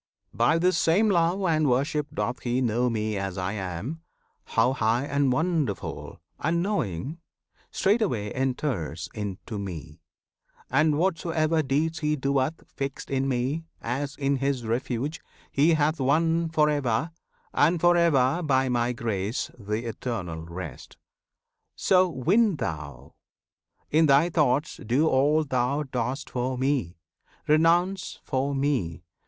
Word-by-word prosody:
By 120 +8 +3
this 175 0 +2
same 200 +6 +3
love 175 +2 +2
and 155 -5 +2
worship 145 +4 +1
doth 125 - -2
he 120 +1 -1
know 120 0 +1
Me 110 -2 -1
as 95 -1 -3
I 90 +1 -2
am, 100 - -5 0.4
how 130 - +2
high 115 +1 +1
and 140 -2 +1
wonderful, 155 - -2 0.2
And 170 +3 0
knowing, 150 - -2 0.5
straightway 190 - +1
enters 125 - -2
into 105 0 -5
Me. 80 -5 -7 0.7
And 150 +3 +3
whatsoever 165 -2 +1
deeds 155 +3 0
he 150 0 +1
doeth 140 +2 -1
fixed 135 0 -5
In 135 0 0
Me, 135 +5 -1
as 135 +4 -3
in 140 -1 0
his 135 -2 -1
refuge 125 +6 -2 0.3
he 155 +4 +4
hath 155 +1 +1
won 165 +5 +2
For 155 -1 +3
ever 145 0 0 0.4
and 165 +4 +3
for 175 +1 +5
ever 165 -2 +3
by 135 -4 +2
My 120 0 +1
grace 110 -2 -2
Th' 100 - -13 0.2
Eternal 95 -9 -4
Rest! 85 -6 -8 0.8
So 185 -1 +3
win 185 - +2
thou! 75 - -6 0.8
In 160 +1 +4
thy 145 +5 +4
thoughts 150 -2 +1
Do 130 +8 +2
all 150 +3 +3
thou 135 +1 0
dost 130 +1 -3
for 125 +1 -2
Me! 130 - -1 0.5
Renounce 170 +5 +2
for 140 +1 -1
Me! 130 - -1
135 Hz, 130 wpm, -26 LUFS, 115-160 Hz, 0.8 s, for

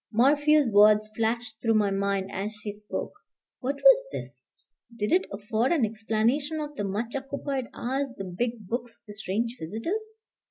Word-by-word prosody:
Morphew's 290 +5 +4
words 210 +1 +6
flashed 225 0 -1
through 225 -1 +2
my 205 -2 +3
mind 195 0 -1
as 205 +3 -3
she 210 0 -5
spoke. 210 0 -5 0.5
What 275 +2 -2
was - - +6
this? - - -7 0.5
Did 210 -2 -1
it 370 - +3
afford 220 +4 0
an 305 -9 +3
explanation 225 +8 0
of 295 -1 -4
the 205 - -3
much 210 +5 -3
occupied 275 -1 -3
hours, 270 +2 -2
the 195 - -4
big 215 +3 -3
books, 240 +2 -4
the 210 - -9
strange 220 +4 -2
visitors? 335 - -4
230 Hz, 160 wpm, -27 LUFS, 210-275 Hz, 0.5 s, words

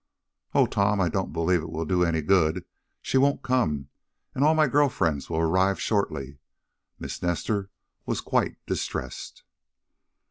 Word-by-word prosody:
"Oh, - - +6
Tom, 100 0 +1
I 90 -3 +2
don't 95 +3 -2
believe 85 +1 +1
it 80 - -7
will 80 +1 -3
do 90 +2 +2
any 80 -2 0
good. 85 0 +2 0.4
She 130 - +2
won't 140 +1 +2
come, 80 - 0 0.4
and 135 - 0
all 155 +2 +5
my 155 -1 +4
girl 145 +1 +3
friends 75 - -1
will - - -2
arrive 95 +4 +2
shortly." 70 -10 -2 0.6
Miss - - -6
Nestor 95 +3 -1 0.4
was - - -1
quite - - 0
distressed. - - -5
90 Hz, 150 wpm, -26 LUFS, 80-105 Hz, 0.6 s, Oh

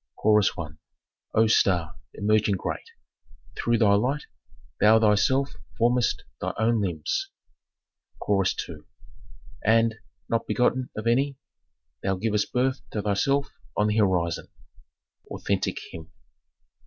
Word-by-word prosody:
Chorus 105 -1 +3
I. 85 - -3 0.7
"O 110 - +5
star, 90 -6 +2 0.2
emerging 105 0 +2
great, - - -5 0.7
through 120 0 +1
thy 105 -3 +4
light, 130 +8 +1 0.6
thou 110 +2 +6
thyself 120 +6 +2 0.2
formest 120 +1 +2 0.2
thy - - -3
own 110 0 +2
limbs." 85 -6 -2 0.9
Chorus 95 -2 +1
II. - - -8 0.9
"And, 115 +1 +4 0.3
not 115 0 -1
begotten 125 +1 +1
of 110 - -4
any, 135 +4 +1 0.6
thou 95 0 0
givest 105 +1 -1
birth 130 +2 0
to 105 - -3
thyself 140 +8 +1 0.3
on 105 0 +3
the 105 - 0
horizon." 90 -5 +1 0.8
Authentic - - -2
hymn. 80 -1 -10
110 Hz, 115 wpm, -26 LUFS, 100-120 Hz, 0.9 s, thou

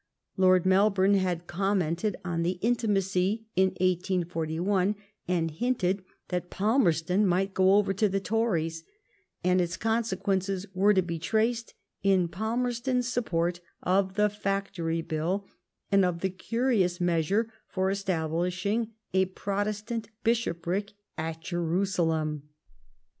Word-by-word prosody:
Lord 185 -1 +4
Melbourne 195 +1 +4
had 180 -3 0
commented 185 +1 0
on 170 -2 -1
the 180 +2 0
intimacy 205 -2 +1
in 190 +1 +5
1841, 180 +1 0 0.3
and 170 -2 0
hinted 195 0 0 0.3
that 180 -1 -2
Falmerston 190 - +2
might 190 +2 +1
go 190 +1 +5
over 205 -1 +3
to 205 +2 +2
the 195 +1 0
Tories; 175 -7 -1 0.6
and 180 0 +3
its 175 +1 -2
consequences 195 -4 0
are 200 +3 +5
to 190 - +4
be 170 -1 -4
traced 225 +6 0 0.3
in 190 -3 +3
Pal 220 +7 -2
merston's 250 0 0
support 175 -8 0 0.2
of 190 +1 +1
the 210 0 +4
Factory 195 -5 -2
Bill, 170 +6 -2 0.5
and 195 -1 +5
of 175 -2 0
the 190 - 0
curious 200 -3 0
measure 180 +6 +1
for 190 0 0
establishing 185 +4 -1 0.2
a 190 0 +4
Protestant 205 +4 -3
Bishopric 200 -3 0 0.2
at 160 0 -4
Jeru 175 +2 0
salem. 160 -5 -1
190 Hz, 120 wpm, -28 LUFS, 175-210 Hz, 0.6 s, in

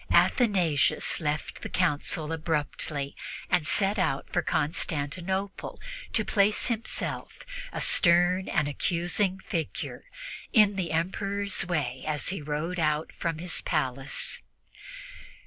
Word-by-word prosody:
Athanasius 185 - +3
left 150 -2 -3
the - - -5
Council 150 +2 0
abruptly 150 -3 -2 0.4
and 175 -4 +3
set 200 +1 +3
out 140 -7 0
for - - +2
Constantinople 175 +5 -2 0.3
to 220 - +1
place 205 0 +3
himself, 230 -2 -3 0.3
a - - -4
stern 175 +1 +4
and 150 - +1
accusing 175 +6 0
figure, 165 - -4 0.5
in 210 -3 +6
the 180 -4 -2
Emperor's 195 +4 0
way 135 -7 -2
as 150 -2 0
he 185 -3 -3
rode 155 +4 -3
out 150 -1 0
from 165 -2 -2
his 175 +2 -2
palace. 135 +1 -1
170 Hz, 110 wpm, -28 LUFS, 150-190 Hz, 0.5 s, in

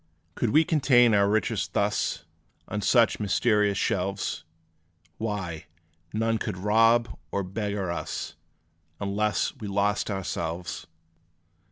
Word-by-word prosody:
Could 120 - -1
we 155 +7 +5
contain 130 -7 +4
our 100 -1 +4
riches 110 +1 0
thus, - - 0 0.4
On 105 - -3
such 115 -1 +3
mysterious 105 -1 +2
shelves, 95 -4 -1 0.8
Why, 95 -8 -4 0.5
none 115 +1 0
could 105 -4 -4
rob 115 +3 +3
or 100 - -1
beggar 100 -1 -3
us; 85 - -4 0.7
Unless 100 0 0
we 105 - -6
lost 100 +2 0
ourselves! 85 -3 -4
105 Hz, 110 wpm, -26 LUFS, 95-115 Hz, 0.8 s, we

